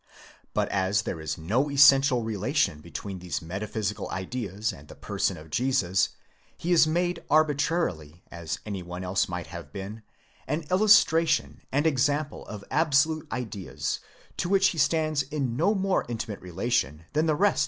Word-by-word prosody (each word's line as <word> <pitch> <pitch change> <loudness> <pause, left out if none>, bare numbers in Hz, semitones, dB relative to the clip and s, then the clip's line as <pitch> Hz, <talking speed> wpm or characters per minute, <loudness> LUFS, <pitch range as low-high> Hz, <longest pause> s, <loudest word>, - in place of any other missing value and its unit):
But - - +2
as 100 +2 +1
there 80 - -4
is 80 - -3
no 115 - 0
essential 135 -2 +6
relation 105 - 0
between 95 +3 -7
these 90 -1 -3
meta 95 +5 -5
physical 105 -1 -3
ideas 105 +2 -3
and 70 +1 -13
the - - -12
person - - -2
of 75 0 -13
Jesus, 110 - +2 0.5
he 175 - -3
is 165 -2 +6
made 175 +2 0
arbitrarily, 145 - +1
as 85 -2 -4
any 100 -3 -4
one 90 +1 -7
else 95 +1 0
might 90 -2 -4
have - - -8
been, 100 +3 -7 0.5
an 155 +2 -1
illustration 185 -5 +4
aud 145 +3 +1
example 145 0 0
of 105 -2 -7
absolute 155 0 +2
ideas 110 -7 -3 0.4
to 175 - -1
which 195 0 +4
he 165 - -4
stands 155 0 +2
in 135 -4 -3
no 205 - +2
more 195 -1 +1
intimate 110 -3 -4
relation 90 -3 -1
than 155 +2 +2
the 155 - +3
rest 205 +6 +4
INTRODUCTION. - - -4
120 Hz, 165 wpm, -27 LUFS, 95-155 Hz, 0.5 s, essential